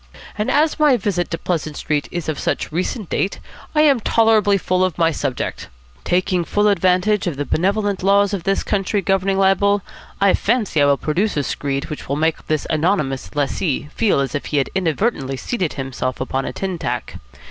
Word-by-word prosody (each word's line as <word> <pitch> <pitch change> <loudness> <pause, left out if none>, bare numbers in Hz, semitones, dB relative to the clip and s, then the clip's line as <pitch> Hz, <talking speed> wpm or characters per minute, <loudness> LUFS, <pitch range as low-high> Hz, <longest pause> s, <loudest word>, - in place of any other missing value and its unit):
And 210 - -1
as 305 +2 +2
my 295 -4 +5
visit 190 -4 -1
to 165 - -2
Pleasant 160 -4 -3
Street 145 -1 -1
is 175 -2 -4
of 155 -2 -2
such - - -2
recent 185 +5 -2
date, 195 - -1 0.4
I 300 - +5
am 285 -5 +5
tolerably 220 -2 +3
full 185 -1 0
of 185 -4 -1
my 165 -1 +3
subject. 140 -4 -3 0.4
Taking 180 0 +1
full 205 +5 +1
advantage 190 +1 +2
of 160 -6 -2
the 145 - -2
benevolent 200 +4 0
laws 200 +1 +3
of 195 - -2
this 195 +1 0
country 200 0 -1
governing 195 +1 +1
libel, 195 +1 +3 0.4
I 200 -1 +4
fancy 215 -9 +1
I - - +5
will 140 -1 +3
produce 175 +7 -1
a 145 - +1
screed 140 +2 -3
which 150 - -7
will 140 - 0
make 160 +2 -1
this 155 -2 0
anonymous 155 -5 0
lessee 145 0 -1
feel 220 -9 +2
as 135 +3 -3
if 145 - -3
he 150 - -1
had 135 - 0
inadvertently 165 - -1
seated 185 - -2
himself 130 -2 -4
upon 135 +1 -2
a - - -4
tin 190 -3 -4
tack. - - -4
185 Hz, 190 wpm, -20 LUFS, 150-200 Hz, 0.4 s, my